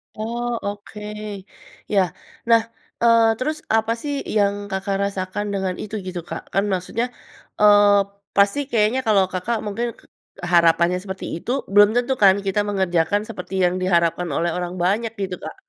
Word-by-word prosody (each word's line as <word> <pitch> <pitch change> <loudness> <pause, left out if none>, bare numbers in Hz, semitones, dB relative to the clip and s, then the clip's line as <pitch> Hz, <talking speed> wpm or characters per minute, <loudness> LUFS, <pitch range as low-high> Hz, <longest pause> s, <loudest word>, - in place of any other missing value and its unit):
Oh 235 +3 -3 0.2
oke. 205 +1 -7 0.9
Ya, 195 - +5 0.5
nah, 230 0 +6 0.4
eee, 230 -1 +5
terus 305 +4 -2 0.2
apa 225 0 +1
sih 290 -1 -3 0.2
yang 200 -1 +3 0.2
Kakak 190 +1 -2
rasakan 200 +1 -3
dengan 190 -2 -1
itu 215 +1 -6
gitu 180 -1 -4
Kak? - - -4
Kan 195 - +2
maksudnya, 185 +6 -1 0.6
eee, 205 0 +7 0.5
pasti 200 +7 +4
kayaknya 225 +3 +2
kalau 200 -3 +5
Kakak 205 +6 -1
mungkin 230 +4 -2
k - - -20 0.5
harapannya 170 +1 +4
seperti 190 -1 -6
itu, 205 +8 -5 0.2
belum 205 0 +7
tentu 245 +2 +1
kan 190 -1 +7
kita 195 +2 +1
mengerjakan 190 0 +1
seperti 190 -3 -8
yang 180 0 +2
diharapkan 170 -1 +1
oleh 170 +1 +1
orang 180 0 -3
banyak 215 +5 +1
gitu 185 -2 -2
Kak. - - -7
200 Hz, 155 wpm, -22 LUFS, 185-220 Hz, 0.9 s, eee